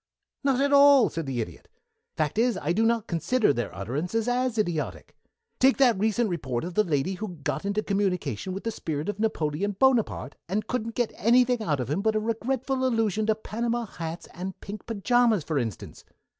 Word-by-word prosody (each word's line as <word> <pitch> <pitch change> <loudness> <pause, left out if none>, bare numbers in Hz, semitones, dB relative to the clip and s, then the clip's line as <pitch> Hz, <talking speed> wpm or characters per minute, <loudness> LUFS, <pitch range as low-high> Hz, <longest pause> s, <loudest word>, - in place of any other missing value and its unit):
"Not 270 -2 +2
at 280 +1 +2
all," 280 -3 +7
said 165 -3 -4
the 125 -3 -1
Idiot. 85 -8 -8 0.5
"Fact 155 +7 0
is, 240 0 +2
I 160 +4 -1
do 225 +4 +3
not 230 -2 +1
consider 210 - +1
their 120 -5 -3
utterances 155 - -2
as 245 -1 0
idiotic. 175 -8 -2 0.4
Take 265 +1 +5
that 245 -7 +4
recent 220 +2 +1
report 135 - -3
of 175 +1 -5
the 215 - +3
lady 160 +1 0
who 190 -1 -6
got 150 +7 -2
into 200 +1 0
communication 185 - -1
with 195 +2 -5
the 230 - -1
spirit 155 -3 -4
of 205 - -4
Napoleon 200 -2 -1
Bonaparte, 230 - +2 0.2
and 205 +3 -1
couldn't 230 -1 -3
get 240 -2 0
anything 245 +2 +3
out 150 -9 0
of 125 +1 -3
him 170 +6 0
but 220 +1 +1
a - - +3
regretful 260 +4 -1
allusion 220 -4 +1
to 220 - +3
Panama 235 +2 -2
hats 165 -4 -7
and 185 +1 -6
pink 205 +1 -8
pajamas, 230 -2 +2
for 150 -1 -1
instance. 115 -7 -5
210 Hz, 190 wpm, -26 LUFS, 165-235 Hz, 0.5 s, all